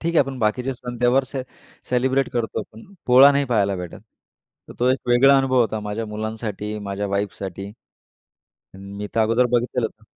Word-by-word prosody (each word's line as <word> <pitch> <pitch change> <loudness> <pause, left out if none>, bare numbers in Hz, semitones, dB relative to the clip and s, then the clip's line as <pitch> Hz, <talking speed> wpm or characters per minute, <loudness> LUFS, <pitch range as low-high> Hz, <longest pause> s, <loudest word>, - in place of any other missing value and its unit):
ठीक 170 +1 -2
आहे. - - +5
आपण 135 -1 -2
बाकीचे 125 +4 0
सण-त्योहार 125 +2 0 0.6
सेलिब्रेट 130 +2 +1
करतो 120 -2 -2
आपण, 110 +1 -12 0.2
पोळा 130 +3 +8
नाही 140 0 +1
पाहायला 105 -6 +1
भेटत. 90 -2 -8 0.7
तर - - -9
तो 125 - +2
एक 130 - +1
वेगळा 135 +3 +6
अनुभव 130 -1 +2
होता 110 -2 0
माझ्या 105 +2 -4
मुलांसाठी, 105 -1 -5
माझ्या 100 0 -4
वाईफसाठी. 100 -1 -4 1.0
मी 100 +2 -7
तर 115 - +2
अगोदर 115 +3 +3
बघितलेलं 120 0 0
होतं. 110 0 -16
115 Hz, 160 wpm, -22 LUFS, 105-125 Hz, 1.0 s, पोळा